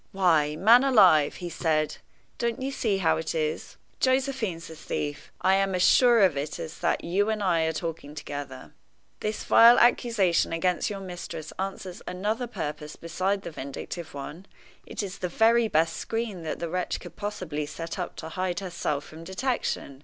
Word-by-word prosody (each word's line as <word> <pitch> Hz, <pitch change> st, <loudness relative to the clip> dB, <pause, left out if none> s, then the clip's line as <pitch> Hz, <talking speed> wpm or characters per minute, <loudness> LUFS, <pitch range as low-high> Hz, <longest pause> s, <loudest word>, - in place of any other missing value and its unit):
"Why, 160 Hz, -6 st, +3 dB
man 230 Hz, +9 st, +6 dB
alive," 185 Hz, -, +5 dB
he 175 Hz, -2 st, -6 dB
said, 155 Hz, -3 st, 0 dB, 0.4 s
"don't 235 Hz, -1 st, -1 dB
you 265 Hz, +1 st, -3 dB
see 220 Hz, -7 st, 0 dB
how 180 Hz, -4 st, +2 dB
it 160 Hz, +1 st, -3 dB
is? 155 Hz, -1 st, -2 dB, 0.2 s
Josephine's 260 Hz, -10 st, 0 dB
the 160 Hz, -, -10 dB
thief! 145 Hz, -1 st, -5 dB
I 190 Hz, -, +4 dB
am 195 Hz, -1 st, +2 dB
as 180 Hz, -, +2 dB
sure 240 Hz, 0 st, +6 dB
of 185 Hz, -6 st, +4 dB
it 140 Hz, +2 st, -3 dB
as 160 Hz, -, -7 dB
that 170 Hz, -, 0 dB
you 200 Hz, +5 st, +1 dB
and 215 Hz, -1 st, -1 dB
I 170 Hz, -4 st, +2 dB
are 160 Hz, -, +1 dB
talking 160 Hz, -3 st, -5 dB
together. 145 Hz, -3 st, -7 dB, 0.5 s
This 215 Hz, 0 st, -3 dB
vile 235 Hz, +1 st, +7 dB
accusation 220 Hz, -9 st, +3 dB
against 175 Hz, +2 st, 0 dB
your 200 Hz, -2 st, -5 dB
mistress 175 Hz, -4 st, -7 dB
answers 190 Hz, -1 st, -5 dB
another 210 Hz, +7 st, -2 dB
purpose 150 Hz, -8 st, -5 dB
besides 190 Hz, +4 st, -2 dB
the -, -, -6 dB
vindictive 145 Hz, +3 st, -7 dB
one 150 Hz, +7 st, -8 dB, 0.4 s
it -, -, -4 dB
is 190 Hz, -2 st, -6 dB
the 180 Hz, -, -2 dB
very 230 Hz, +4 st, +4 dB
best 165 Hz, -3 st, +1 dB
screen 225 Hz, -5 st, -3 dB
that 160 Hz, -1 st, -4 dB
the 170 Hz, -, -4 dB
wretch 180 Hz, +1 st, -2 dB
could -, -, -11 dB
possibly 175 Hz, -8 st, -4 dB
set 165 Hz, +2 st, -6 dB
up -, -, -4 dB
to 160 Hz, -, -7 dB
hide 180 Hz, 0 st, -2 dB
herself 170 Hz, -6 st, -3 dB
from 160 Hz, +1 st, -11 dB
detection. 190 Hz, -, -3 dB
180 Hz, 175 wpm, -27 LUFS, 160-210 Hz, 0.5 s, vile